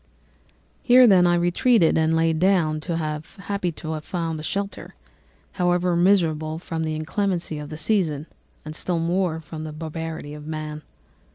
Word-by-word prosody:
"Here, 250 0 +7
then, 185 -5 +6
I 175 - +4
retreated 175 +3 +3
and 160 0 +2
lay 165 0 +2
down 160 -3 +2
happy 170 +4 -3
to 155 +1 -6
have 155 -1 -4
found 165 -3 -3
a - - -6
shelter, 200 +5 -4 0.6
however 175 0 +1
miserable, 165 -4 +2
from 165 -1 -4
the 155 -1 -2
inclemency 170 0 -2
of 150 -1 -7
the 155 - -7
season, 155 -4 +1 0.4
and 155 0 -7
still 175 +2 -1
more 170 0 0
from 155 0 -8
the 155 - -5
barbarity 160 -1 -6
of 150 0 -9
man. 155 -1 -5
165 Hz, 155 wpm, -23 LUFS, 155-180 Hz, 0.6 s, Here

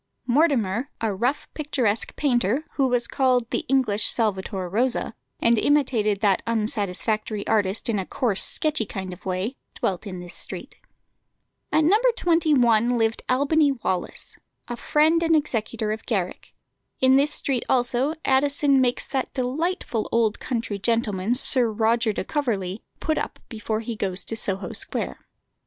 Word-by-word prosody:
Mortimer, 255 - +2
a 220 -2 -1
rough, 245 +9 -1
picturesque 255 -8 -1
painter, 250 0 +1
who 270 -2 +1
was 245 -2 0
called 255 -3 +1
"the - - -1
English 245 -6 +1
Salvator 195 -4 -1
Rosa," 235 +5 0 0.3
and 230 -1 +3
imitated 235 -8 +2
that 200 -4 +3
unsatisfactory 215 -1 -1
artist 210 +1 +1
in 220 -4 0
a 190 - -3
coarse, 220 -6 +1
sketchy 305 -9 0
kind 190 -2 -5
of 180 - -14
way, 190 +8 -2 0.2
dwelt 190 +2 -2
in 185 -2 -6
this 175 0 -9
street. - - -7 0.9
At 310 - +3
No. 385 +8 +4 0.2
21 250 - +3
lived 225 0 0
Albany 285 +3 +3
Wallis, 190 -8 -4 0.3
a 240 - -4
friend 310 +6 +2
and 325 -1 +3
executor 225 -7 -1
of 220 +1 -5
Garrick. 190 -6 -3 0.4
In 260 0 +5
this 285 +2 +3
street 265 -4 -2
also 255 +4 +1
Addison 275 0 +3
makes 245 -1 +1
that 265 -2 -3
delightful 265 - -2
old 225 -2 +1
country 230 -5 -3
gentleman, 220 -1 0
Sir 250 -2 +3
Roger 225 +1 +2
de 205 - -3
Coverley, 210 - -2 0.2
put 315 - 0
up - - -4
before 220 -1 -3
he 230 0 -5
goes 195 -2 -1
to 225 - -4
Soho 195 -3 -1
Square. 65 - -4
235 Hz, 145 wpm, -24 LUFS, 210-270 Hz, 0.9 s, In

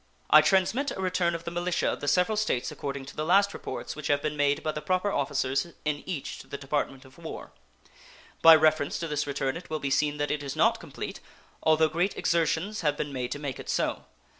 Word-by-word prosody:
I - - +10
transmit 220 +9 +2
a - - -6
return 180 -2 +1
of 165 - -6
the 170 - -5
militia 175 +1 -1
of - - -1
the 145 - -4
several 180 +8 +3
States 210 -13 0
according 140 -1 -5
to 140 - -11
the 155 - -2
last 200 +4 +4
reports - - -6
which 150 -1 -5
have 145 -2 +3
been 150 -1 -1
made 145 -1 +1
by 155 - 0
the 150 - -5
proper 185 +6 0
officers 135 0 0 0.2
in 150 -1 -1
each 170 -7 -4
to - - -12
the 140 - -6
Department 135 -1 -3
of 130 +5 -17
War. 160 - -8 0.9
By 165 0 +10
reference 155 -2 +2
to 165 - -3
this 150 -1 -2
return 135 -1 -1
it 175 - -9
will 155 - -1
be 140 -1 -3
seen 150 +2 +1
that 145 0 -1
it 150 -1 -1
is 140 -2 -5
not - - +3
complete, - - -7 0.4
although 160 0 +4
great 170 +6 -1
exertions 170 +5 0
have 150 -3 +1
been 145 -1 -3
made 125 -2 -3
to - - -6
make 140 -3 -5
it - - -8
so. - - -1
155 Hz, 230 wpm, -28 LUFS, 145-175 Hz, 0.9 s, I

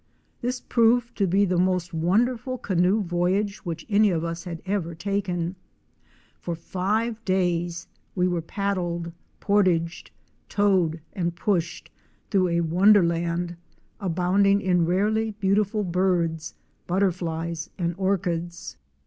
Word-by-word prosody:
This 250 +1 -2
proved 235 0 +2
to 195 - +3
be 195 +3 +3
the 180 -2 +1
most 180 -2 0
wonderful 230 +10 +1
canoe 190 -1 +1
voyage 185 +4 0
which 170 -3 -6
any 210 0 +4
of 165 -3 0
us 170 +1 -4
had 170 -2 -5
ever 185 -4 -2
taken. 180 -1 -2 0.8
Fox 170 -2 -5
five 215 +6 -1
days 175 -3 0 0.3
we 180 -1 +2
were 175 -2 -1
paddled, 175 -2 -2 0.3
portaged, 180 -5 +1 0.4
towed 185 -6 +2
and 175 -2 -2
pushed 185 -3 -1 0.4
through 190 -2 +3
a 170 0 +1
wonderland 170 -1 +3 0.4
abounding 195 +2 +2
in 180 -4 +2
rarely 215 +4 +1
beautiful 205 +2 +1
birds, 175 -3 0 0.3
butterflies 170 -3 -1
and 170 -2 -1
orchids. 175 -3 -2
180 Hz, 115 wpm, -25 LUFS, 170-200 Hz, 0.8 s, any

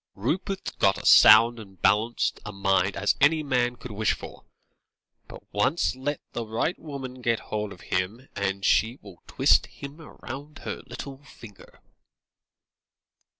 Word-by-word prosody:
"Rupert's 180 - -3
got 95 0 +2
as - - +4
sound 115 +2 +7
and 95 -4 -13
balanced 105 +5 +1
a 105 - -6
mind 95 -1 +1
as 105 +1 +2
any 155 +2 +4
man 125 -3 0
could 125 0 -10
wish 105 0 0
for, - - -11 0.8
but - - -12
once 125 +9 +1
let 145 +3 -3
the 120 - -4
right 115 +10 -2
woman 135 -4 -8
get 115 -2 +1
hold 105 -1 -2
of 90 - -12
him, 105 +8 -3
and 100 0 -2
she 115 +4 +2
will - - -14
twist - - +3
him 140 +2 -10
round 150 -2 -10
her - - -5
little 135 -1 -8
finger." 115 -7 -15
115 Hz, 150 wpm, -26 LUFS, 100-135 Hz, 0.8 s, sound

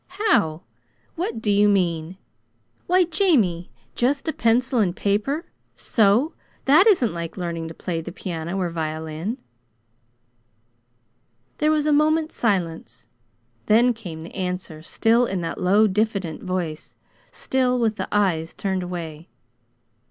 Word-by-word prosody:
"How? 170 - +2 0.5
What 335 - -4
do 210 - +2
you 205 +1 +4
mean? 175 -3 0 0.7
Why, 365 +1 +4
Jamie, 290 - +1 0.2
just 275 +5 0
a 315 - 0
pencil 245 +2 +2
and 185 -5 +1
paper, 225 - -1 0.3
so 225 +8 +2 0.3
that 310 +10 +6
isn't 305 - +3
like 170 +1 -6
learning 170 -2 -4
to 165 - -9
play 165 -2 -3
the 175 - -7
piano 170 0 -5
or 180 -3 -1
violin!" 160 +6 -4 2.2
There 305 - +3
was 305 -1 +2
a 305 - +3
moment's 310 +2 +2
silence. 180 -8 -2 0.6
Then 240 +3 +5
came 180 -9 -8
the 165 - -10
answer, 180 -4 -4
still 230 +8 +2
in 190 -4 -2
that 165 - -4
low, 200 +4 +4
diffident 200 -5 -1
voice; 175 -4 -4 0.3
still 255 -1 0
with 225 -3 0
the 190 - -3
eyes 175 -6 0
turned 190 -2 -2
away. 170 -2 -6
200 Hz, 130 wpm, -23 LUFS, 170-245 Hz, 2.2 s, that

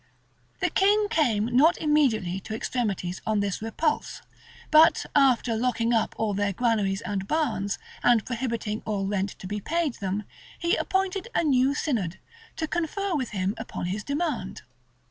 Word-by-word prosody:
[] - - -38
The - - +1
king 410 +2 +3
came 240 - +2
not 315 +7 +5
immediately 245 - +1
to 220 +3 -6
extremities 200 -7 -2
on 215 -1 0
this 200 -1 -2
repulse; 295 +8 -2 0.5
but 310 +1 +6
after 255 -5 +4
locking 235 0 +1
up 225 -2 +1
all 220 -2 0
their 200 0 0
granaries 210 -3 +1
and 200 -3 -3
barns, 230 -10 0 0.2
and 240 -3 +4
prohibiting 230 -3 -3
all 205 -3 -2
rent 195 0 -1
to - - -10
be 205 +2 -4
paid 325 - -1
them, 195 +1 -2 0.3
he 340 +4 +1
appointed 385 +2 -1
a - - +3
new 275 -2 +3
synod, 215 - -1 0.4
to 315 - -2
confer 355 +4 -2
with 260 -5 -1
him 190 0 -1
upon 225 - -5
his 210 +1 -4
demand. 280 - -3
230 Hz, 160 wpm, -26 LUFS, 205-305 Hz, 0.5 s, but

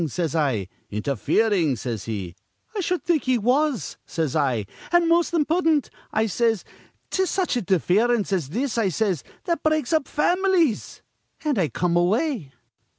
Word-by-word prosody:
says 165 0 -2
I. 130 - +1 0.2
'Interfering' 145 - +1
says 115 -3 -4
he. 100 -6 -4 0.4
'I 405 - 0
shud 360 0 -1
think 335 -4 +1
he 255 -1 +3
was,' 255 +4 +1
says 160 -5 -2
I, 130 -9 +1 0.3
'an' 345 -1 +4
most 335 +1 +3
impudent,' 320 -2 +2 0.2
I 220 +1 +1
says. 225 -1 0 0.5
''Tis 380 -1 +1
such 370 -7 0
interference 205 +2 +2
as 165 -8 -1
this,' 240 - -1
I 205 -4 +2
says, 185 - 0 0.2
'that 340 -1 -1
breaks 310 -3 +1
up 310 -4 +2
fam'lies'; 350 - +1 0.4
an' 290 -8 +1
I 170 - +2
come 170 +6 -1
away. 195 - +1
225 Hz, 150 wpm, -24 LUFS, -, 0.5 s, an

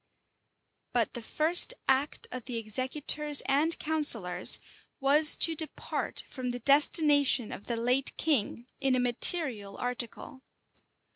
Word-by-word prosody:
But 235 -3 -1
the 240 - -6
first 325 - +2
act 270 +2 -1
of 255 -2 -7
the 245 -3 -5
executors 270 +6 0
and 300 +5 0
counsellors 230 - +1 0.4
was 290 +3 +3
to 330 - +3
depart 315 0 -4
from 255 -2 -7
the 245 - -4
destination 285 -2 +3
of 200 - -10
the 235 - -3
late 250 +4 0
king 245 -6 -1
in 270 -2 0
a - - -1
material 245 - +1
article. 245 +1 -5
265 Hz, 125 wpm, -28 LUFS, 240-300 Hz, 0.4 s, was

